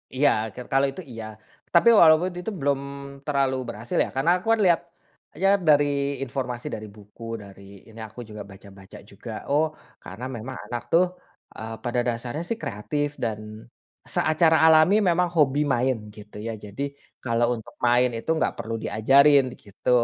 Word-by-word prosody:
Iya. 145 +2 +4 0.3
Ker 125 - -8
kalau 135 +1 +4
itu 185 - -8
iya. 115 -2 -7 0.5
Tapi 175 +7 +6
walaupun 165 +3 +6
itu 220 +5 -4
belum 140 -1 +1 0.5
terlalu 140 -2 +1
berhasil 115 0 -5
ya. - - -5
Karena 150 +6 +2
aku 185 - -12
kan - - -7
lihat, 170 -2 +4 0.6
ya 195 - +5 0.2
dari 145 -1 +6 0.4
informasi 125 -2 -4
dari 110 0 -8
buku, 105 +2 -15 0.2
dari 100 0 -14 0.3
ini 110 0 -13
aku 110 +3 -14
juga 105 -1 -8
baca-baca 95 +1 -14
juga, 110 +4 -9 0.2
oh, 150 +2 +4 0.4
karena 125 - -8
memang 120 +4 -7
anak 120 +1 -4
tuh, 175 +2 +5 0.5
eee, 110 +1 -6
pada 120 0 -1
dasarnya 120 +5 -3
sih 230 - -1
kreatif 145 +8 -2 0.2
dan 110 -1 -5 0.4
seacara 160 +1 +3
alami 160 +4 +6
memang 180 -1 +2
hobi 145 -2 +3
main 125 0 +1 0.2
gitu 105 -1 -12
ya. 115 - -3
Jadi 105 +4 -7 0.4
kalau 120 -1 +1
untuk 110 - -14
main 120 +1 +4
itu 115 - -8
gak - - +1
perlu 115 - -5
diajarin 135 +6 +5 0.2
gitu. 100 -1 -6
125 Hz, 160 wpm, -24 LUFS, 110-150 Hz, 0.6 s, Tapi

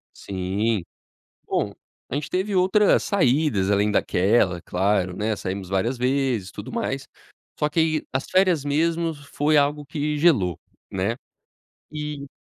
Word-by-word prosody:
Sim. 100 +2 -1 0.6
Bom, - - -1 0.4
a - - -5
gente 145 +1 -3
teve 190 +2 -1
outras 190 +3 +4
saídas, 135 - +2
além 100 +1 +3
daquela, 95 -2 +2
claro, 95 -1 0
né, 110 +1 0
saímos 95 -1 -5
várias 115 +7 0
vezes 125 -7 0
e - - -21
tudo - - -8
mais, - - -3 0.5
só 150 - +2
que 165 +2 0
aí 160 -1 +1
as 130 - -1
férias 185 -6 +3
mesmo 165 +3 +1
foi 145 +1 0
algo 145 +1 +2
que 150 +1 -2
gelou, 120 - +3 0.3
né. 100 +5 -1 0.8
E 150 -2 -5
135 Hz, 140 wpm, -24 LUFS, 100-155 Hz, 0.8 s, outras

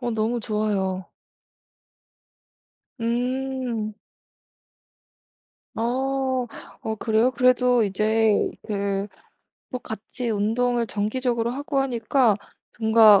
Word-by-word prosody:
어 240 -1 -1
너무 225 +2 0
좋아요. 200 -3 -1 2.0
음. 245 -2 -1 1.8
어. 260 +2 0 0.4
어 220 - -2
그래요? 225 +2 +3
그래도 250 -2 +4
이제 215 +2 +2 0.2
그 200 -1 -1 0.6
뭐 250 - -3
같이 230 +3 -5
운동을 230 +3 +1
정기적으로 235 +3 -1
하고 280 +2 -2
하니까 245 -3 +2 0.4
뭔가 220 -2 +7
230 Hz, 165 characters per minute, -24 LUFS, 215-250 Hz, 2.0 s, 뭔가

